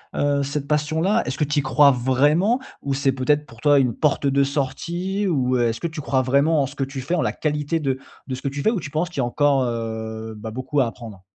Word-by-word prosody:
heu, 145 -1 +1
cette 140 0 -3
passion-là? 160 +8 +1
Est-ce 130 - -3
que 150 - +1
tu 145 +1 +1
y - - +2
crois 135 +2 +5
vraiment? 145 - +2 0.2
Ou 140 -1 -2
c'est, 135 0 +1
peut-être, 145 +3 +1
pour 115 -3 -16
toi 145 0 +4
une 125 -4 +1
porte 145 0 +1
de 140 0 +3
sortie 170 +8 -2
ou 130 -6 +1
est-ce 115 -2 0
que 170 - 0
tu 160 -1 -7
crois 130 -2 +1
vraiment 140 +4 +3
en - - -2
ce - - -12
que 135 - -1
tu 135 0 -6
fais, 160 +8 -1
en 165 - +1
la - - 0
qualité 150 +1 -1
de 135 -2 -1 0.3
de 130 - -3
ce 130 - -9
que - - -3
tu 140 +1 -3
fais 220 - +3
ou 220 - -1
tu 145 - -7
penses 165 +3 -1
qu'il 165 - -6
y - - +2
a - - +1
encore, 140 +2 +2
heu 110 -1 -4
bah, 110 +1 -7
beaucoup 130 +5 -2
à 130 - +3
apprendre? 110 -5 -9
140 Hz, 265 wpm, -22 LUFS, 130-150 Hz, 0.3 s, crois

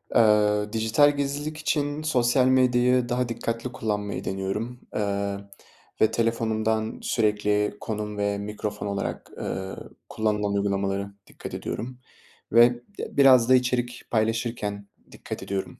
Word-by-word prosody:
Eee, 105 -2 +4
dijital 115 +7 +3
gizlilik 145 +2 -2
için 150 -1 -1
sosyal 125 -3 +3
medyayı 125 -1 +3
daha 125 0 0
dikkatli 115 +1 -3
kullanmayı 105 -4 -3
deniyorum, 100 +6 -3 0.2
eee, 100 -1 -1 0.6
ve 110 - +5
telefonumdan 110 -1 0
sürekli 105 -2 +1
konum 105 -1 -4
ve 100 0 0
mikrofon 105 0 -4
olarak, 100 0 -4
eee, 95 0 -4 0.3
kullanılan 105 -2 0
uygulamalara 100 0 -1
dikkat - - -9
ediyorum 125 +2 -5 0.5
ve 120 +2 +7 0.3
d - - -6
biraz 130 -4 +6
da 130 - +8
içerik 125 -1 0
paylaşırken 110 -2 -1 0.2
dikkat - - -7
ediyorum 95 -1 -4
110 Hz, 120 wpm, -25 LUFS, 105-125 Hz, 0.6 s, da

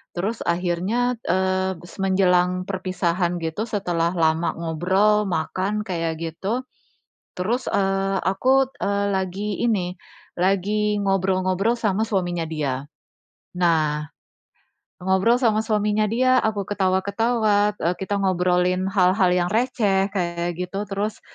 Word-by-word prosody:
terus 205 +6 -2
akhirnya, 185 +8 0
eee, 190 0 +1 0.2
menjelang 180 -1 +2
perpisahan 180 -2 -1
gitu, 160 +6 -2
setelah 175 -5 0
lama 160 0 +1
ngobrol, 190 +6 +2
makan 185 +5 -1
kayak 165 -3 -2
gitu, 195 +10 -3 0.7
terus, 225 +8 -1
eee, 195 0 +1
aku, 260 +7 +2
eee, 200 0 0
lagi 190 +2 -2
ini, 185 -6 0 0.4
lagi 205 +3 +1
ngobrol-ngobrol 190 +1 +1
sama 215 -1 +1
suaminya 175 -5 -1
dia. 140 -4 -2 0.7
Nah, 155 -4 +1 1.0
ngobrol 190 +5 +3
sama 220 -3 +3
suaminya 210 -1 +1
dia, 255 +4 +3
aku 215 -3 -1
ketawa-ketawa, 205 +2 +1
e 170 - 0
kita 195 +1 -2
ngobrolin 180 0 +1
hal-hal 185 0 +3
yang 175 0 +1
receh, 215 -5 +1
kayak 175 -2 -2
gitu, 195 +3 -3
terus, 205 +2 -3
190 Hz, 110 wpm, -23 LUFS, 180-210 Hz, 1.0 s, ngobrol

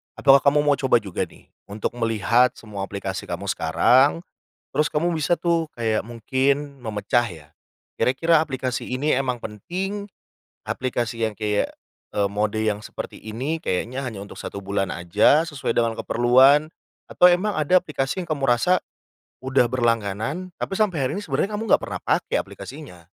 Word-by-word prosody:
Apakah 135 0 +6
kamu 145 +2 +3
mau 145 -1 +3
coba 130 -3 +3
juga 95 -3 -3
nih - - -20 0.2
untuk 105 +1 -3
melihat 115 +2 +2
semua 100 -3 -6
aplikasi 100 -1 -5
kamu - - -3
sekarang, 140 +7 +3 0.5
terus 150 +2 +2
kamu 170 +3 0
bisa 165 +2 +1
tuh 165 -2 0
kayak 110 -2 0
mungkin 135 +4 -1
memecah 110 +2 0
ya. 80 -4 -12 0.5
Kira-kira 160 +5 +3
aplikasi 130 -4 -3
ini 135 +4 +1
emang 130 -2 -1
penting 190 - -5 0.6
aplikasi 120 -3 -2
yang 110 - +1
kayak, 105 -1 -1 0.4
eee, 100 -1 +1
mode 105 +1 -1
yang 105 -1 -1
seperti - - -7
ini 125 +9 -3
kayaknya 125 +9 -2
hanya 115 -6 -5
untuk 100 +1 -9
1 100 - -6
bulan 100 -1 -2
aja 105 - +3
sesuai 140 -6 -3
dengan 115 -1 +1
keperluan, 130 +7 +4 0.4
atau - - +3
emang 195 +4 +1
ada 155 +4 +4
aplikasi 150 -1 -3
yang 175 - -8
kamu 145 -3 -2
rasa 180 +10 +2 0.6
udah 130 -2 +3
berlangganan, 115 - -1
tapi - - -4
sampai 190 -9 +1
hari - - -2
ini 205 - -4
sebenarnya 205 0 -1
kamu 210 - -2
nggak - - +5
pernah - - -5
pake - - 0
aplikasinya. 130 - -11
130 Hz, 160 wpm, -23 LUFS, 110-150 Hz, 0.6 s, Apakah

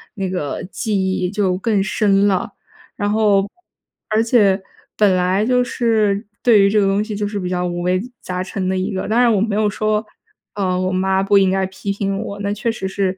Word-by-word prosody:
那 195 -3 -3
个， 165 -7 -3
记 210 +3 -3 0.2
忆 185 -1 -1
就 195 -2 0
更 200 0 +1
深 200 0 +2
了。 190 -2 0 0.4
然 205 -1 -1
后 205 -2 +3 0.6
而 215 +1 +2
且 205 -5 +3 0.4
本 205 -3 +4
来 185 +3 +1
就 250 +1 +2
是 220 -4 0 0.2
对 225 -5 +5
于 195 - +4
这 210 +1 +2
个 195 - +2
东 195 +2 +1
西 215 -1 -5
就 205 0 -2
是 205 0 -4
比 180 - -3
较 180 0 -1
五 175 0 -3
味 180 +1 +1 0.2
杂 180 0 -4
陈 190 0 -4
的 190 - 0
一 185 +3 -2
个， 190 - -3
当 225 +3 +1
然 245 -1 +5
我 210 - +2
没 210 0 0
有 210 0 +2
说， 215 +1 0 0.5
呃， 185 -3 0
我 185 0 -1
妈 190 +1 +1
不 200 +1 +3
应 190 -1 +4
该 190 0 +1
批 190 +1 -5
评 195 0 -2
我， 200 0 -5
那 200 0 -2
确 220 +3 -1
实 190 -4 -4
是 190 -1 -2
200 Hz, 235 characters per minute, -19 LUFS, 190-215 Hz, 0.6 s, 对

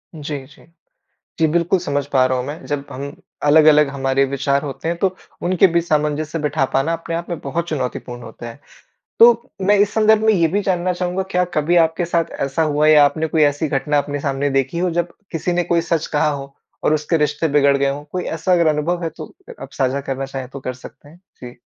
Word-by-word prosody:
जी, 145 -3 -6
जी। 145 +2 -19 0.7
जी, 160 - +4
बिल्कुल 170 +4 +1
समझ 145 -5 -2
पा 130 -1 +4
रहा 130 0 0
हूंँ 125 - -3
मैं। 145 +3 -7
जब 145 -1 -3
हम 140 +2 -6 0.3
अलग-अलग 150 0 +6
हमारे 135 0 0
विचार 140 +1 0
होते 145 +2 -5
हैं 170 - -1
तो 190 0 0 0.3
उनके 185 +1 +4
बीच 170 -1 0
सामंजस्य 150 +1 0
बिठा 150 -2 0
पाना 135 +5 +1
अपने 165 0 -4
आप 170 +1 -5
में 170 - -3
बहुत 170 +5 -3
चुनौतीपूर्ण 125 -4 -4
होता 115 +1 -9
है। 115 - -12 0.6
तो 235 +1 +9 0.3
मैं 205 +2 +5
इस 205 +1 +2
संदर्भ 220 0 +4
में 220 0 +4
ये 170 -4 +3
भी 200 +6 0
जानना 180 -1 0
चाहूँगा 180 +1 -2
क्या 180 0 +2
कभी 155 +3 +1
आपके 165 +2 -3
साथ 170 -1 -1
ऐसा 140 +4 -1
हुआ 150 0 +2
या 150 -2 +7
आपने 160 +2 -1
कोई 160 0 +1
ऐसी 145 +2 +1
घटना 145 +1 0
अपने 145 0 -2
सामने 140 0 -1
देखी 135 +4 -1
हो 180 +1 +1
जब 175 - -2 0.2
किसी 165 +2 -2
ने 175 0 +1
कोई 170 0 +1
सच 165 -1 -1
कहा 150 0 +1
हो 140 -1 -6 0.3
और 155 - +3
उसके 155 +2 0
रिश्ते 150 +2 0
बिगड़ 140 -1 +3
गए 140 0 +1
हो? 140 +1 -5
कोई 180 -1 -3
ऐसा 165 +3 -2
अगर 170 -2 +3
अनुभव 160 +4 0
है 165 - -1
तो 155 0 -9 0.2
अ - - -7
आप 135 - -8
साझा 135 +1 -1
करना 135 0 -4
चाहे 135 -1 -6
तो 135 +2 -9
कर 130 -1 -5
सकते 130 +3 -14
हैं। 165 - -17 0.2
जी। 125 -1 -10
150 Hz, 225 wpm, -19 LUFS, 140-170 Hz, 0.7 s, तो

